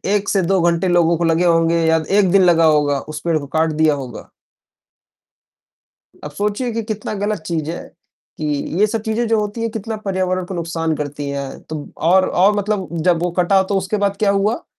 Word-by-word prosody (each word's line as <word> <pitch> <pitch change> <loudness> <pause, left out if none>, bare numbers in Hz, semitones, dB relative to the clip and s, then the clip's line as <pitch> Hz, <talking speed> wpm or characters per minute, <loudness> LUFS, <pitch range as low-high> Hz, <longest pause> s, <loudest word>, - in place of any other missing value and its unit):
1 200 0 -1
से 195 - +2
2 190 +2 +1
घंटे 170 +2 +1
लोगों 170 -1 +3
को 170 - -2
लगे 165 +2 +2
होंगे 165 -1 +2
या 160 0 +2
1 190 -4 +3
दिन 195 -1 +5
लगा 165 -2 +4
होगा, 145 -2 +3
उस 155 +1 -8
पेड़ 165 -2 +2
को 140 -2 -6
काट 160 +2 0
दिया 155 0 +2
होगा। 130 -5 -7 1.9
अब 150 - -6
सोचिए 210 - -2
कि 230 - -1
कितना 215 -1 -4
गलत 205 -1 -2
चीज़ 160 -2 -3
है 175 - -5 0.6
कि 155 - -3 0.3
ये 210 - +6
सब 220 0 -3
चीजें 220 +2 -1
जो 225 -1 +2
होती 210 +2 -4
है, 230 - -1
कितना 225 0 -5
पर्यावरण 185 -1 -1
को 190 - -7
नुकसान 165 -2 -2
करती 145 -1 -5
है, 140 -1 -5
तो 155 -2 -8
और 185 +3 +3
और 195 +4 +3
मतलब 205 -2 -1 0.2
जब 170 -1 +3
वो 180 - 0
कटा 190 +2 +4
तो 195 +1 -1
उसके 190 +2 -2
बाद 200 0 -1
क्या 205 -1 +1
हुआ? 210 +9 0
175 Hz, 205 wpm, -19 LUFS, 160-205 Hz, 1.9 s, ये